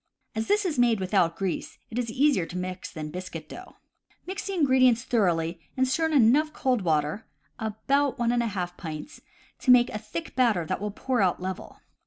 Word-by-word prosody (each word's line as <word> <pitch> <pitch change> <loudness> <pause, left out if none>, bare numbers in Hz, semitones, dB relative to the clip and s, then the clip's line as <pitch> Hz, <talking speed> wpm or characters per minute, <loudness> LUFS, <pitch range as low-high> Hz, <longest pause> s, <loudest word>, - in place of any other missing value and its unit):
As 220 0 -2
this 415 -1 +2
is 315 -8 -1
made 235 -3 +4
without 185 -3 +1
grease, 190 -3 -3
it 235 - -2
is 235 -2 -2
easier 250 - +2
to 180 - -6
mix 185 0 -5
than 155 -2 -6
biscuit 185 +2 -7
dough. - - -11 0.5
Mix 375 +2 -5
the 395 - -2
ingredients 260 -6 +4
thoroughly 170 -8 0 0.2
and 260 0 +3
stir 320 +5 +1
in 320 - -3
enough 285 +4 +4
cold 255 -5 +1
water 155 +3 0 0.3
(about 270 +6 0
one 235 -1 +1
and 240 0 +2
a 235 - 0
half 180 -4 -4
pints) 160 - -7 0.4
to - - -3
make 250 -1 +6
a 215 - -4
thick 220 +10 -7
batter 230 -10 +2
that 185 +4 -3
will 210 - -2
pour 245 +3 -1
out 185 -2 +2
level. 185 +1 -6
220 Hz, 200 wpm, -27 LUFS, 185-260 Hz, 0.5 s, make